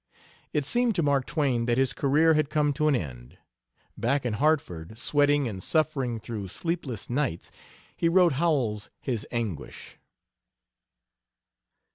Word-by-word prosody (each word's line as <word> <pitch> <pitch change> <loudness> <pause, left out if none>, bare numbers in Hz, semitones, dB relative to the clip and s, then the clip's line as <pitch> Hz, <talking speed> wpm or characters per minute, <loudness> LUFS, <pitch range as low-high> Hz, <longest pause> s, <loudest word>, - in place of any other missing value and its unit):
It 145 - 0
seemed 240 - +1
to 170 - +1
Mark 140 -3 +1
Twain 130 -7 0
that 120 0 +2
his 135 -1 +2
career 155 +4 +3
had 155 -2 +1
come 150 -1 +1
to 150 +2 +1
an 150 - +4
end. 65 - -6 0.6
Back 130 +3 0
in 120 - 0
Hartford, 110 - 0
sweating 145 +1 +2
and 95 -4 -5
suffering 135 - 0
through 105 -3 -6
sleepless 135 - -4
nights, 125 - -2 0.4
he 165 - +1
wrote 175 -2 +5
Howells 130 -9 0
his 120 -5 -3
anguish. 115 -9 -5
135 Hz, 135 wpm, -27 LUFS, 115-155 Hz, 0.6 s, wrote